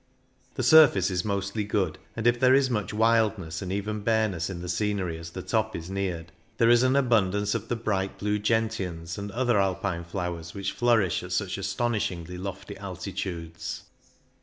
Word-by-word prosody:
The - - -2
surface 125 - +6
is 90 -1 0
mostly 100 +1 -2
good, 100 -5 -1 0.2
and 115 - -4
if 120 0 +4
there 130 +1 +6
is 135 -1 +3
much 105 -4 -1
wildness 110 -7 +1
and 95 -1 -4
even 105 +2 -2
bareness 105 -6 +1
in 90 -2 -5
the - - -5
scenery 95 -1 -1
as 85 0 -8
the 90 +2 -7
top 110 -1 0
is 85 +3 -6
neared, 90 -4 -3 0.3
there 115 0 +5
is 120 0 +6
an 130 0 +3
THE 140 - +4
ALBULA 125 - -4
67 110 -4 +6
abundance 100 +2 -1
of - - -3
the 120 - -1
bright 100 -4 -2
blue 105 +1 0
gentians 100 -7 -1
and 100 0 -5
other 120 -2 +2
Alpine 95 -2 -1
flowers 85 -1 -5
which 100 -1 -2
flourish 115 -8 +2
at - - -8
such - - -1
astonishingly 90 -7 -2
lofty 95 0 -6
altitudes. 90 -3 -5
100 Hz, 185 wpm, -27 LUFS, 90-110 Hz, 0.3 s, surface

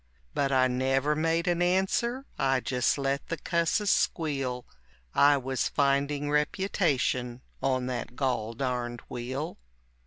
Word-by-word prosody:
But 140 -1 0
I 130 -1 +4
never 135 +3 +1
made 165 +3 +1
an 175 0 +1
answer, 190 +8 +1
I 135 -1 +2
just 125 +1 +1
let 140 0 -1
the 165 - -3
cusses 170 +6 +1
squeal, 135 -6 0 0.5
I 145 0 +5
was 130 -1 -1
finding 140 +1 +1
reputation 145 - 0 0.2
on 130 -2 +1
that 125 -1 -4
gol 120 -5 -1
darned 120 -2 -2
wheel. 130 +5 -4
140 Hz, 125 wpm, -28 LUFS, 130-160 Hz, 0.5 s, I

